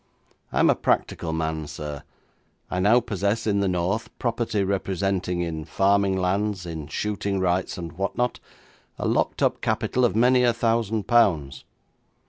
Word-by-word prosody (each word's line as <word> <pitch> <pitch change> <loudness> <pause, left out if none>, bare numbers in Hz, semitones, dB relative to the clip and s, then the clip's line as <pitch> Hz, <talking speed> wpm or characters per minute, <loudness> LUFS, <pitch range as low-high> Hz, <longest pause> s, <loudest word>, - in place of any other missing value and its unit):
I - - -1
am - - +5
a - - +1
practical 80 - 0
man, 80 -1 -2
sir. 75 -1 -6 0.7
I 90 - -1
now 110 +6 +5
possess 105 -1 -1
in 100 -2 +1
the 100 - +1
north 95 +6 -1
property 115 -3 -1
representing, 95 -2 -1
in 80 -2 -3
farming 95 +3 +2
lands, 95 +1 -1
in 80 -3 -6
shooting 100 +3 -2
rights, 90 0 0
and 85 -2 -6
what 95 +5 -3
not, 125 0 0 0.6
a - - -2
locked - - 0
up - - +1
capital 125 - 0
of 120 - +2
many 125 +2 +4
a 120 -1 +4
thousand 115 -2 0
pounds. 80 - +2
100 Hz, 155 wpm, -24 LUFS, 85-110 Hz, 0.7 s, am